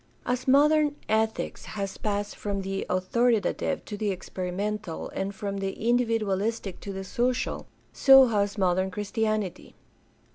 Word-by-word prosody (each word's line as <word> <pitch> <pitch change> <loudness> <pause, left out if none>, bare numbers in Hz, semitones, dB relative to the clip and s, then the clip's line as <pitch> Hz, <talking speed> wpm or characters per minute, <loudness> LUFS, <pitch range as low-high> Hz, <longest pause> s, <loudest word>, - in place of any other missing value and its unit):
As 250 +1 -2
modern 295 +2 +4
ethics 220 0 -1
has 195 -1 -4
passed 205 -1 -2
from 200 -2 -3
the 195 0 -3
authoritative 220 +4 +1
to 210 - -6
the 210 0 -1
experimental 190 0 -4
and 195 +1 -3
from 200 -1 -4
the 195 0 -2
individualistic 225 -4 0
to 200 - -6
the 195 0 -5
social, 245 +6 -1 0.3
so 270 -1 +8
has 205 -3 0
modern 185 0 +2
Chris 200 +1 -6
tianity. 215 -5 -1
205 Hz, 135 wpm, -27 LUFS, 195-230 Hz, 0.3 s, so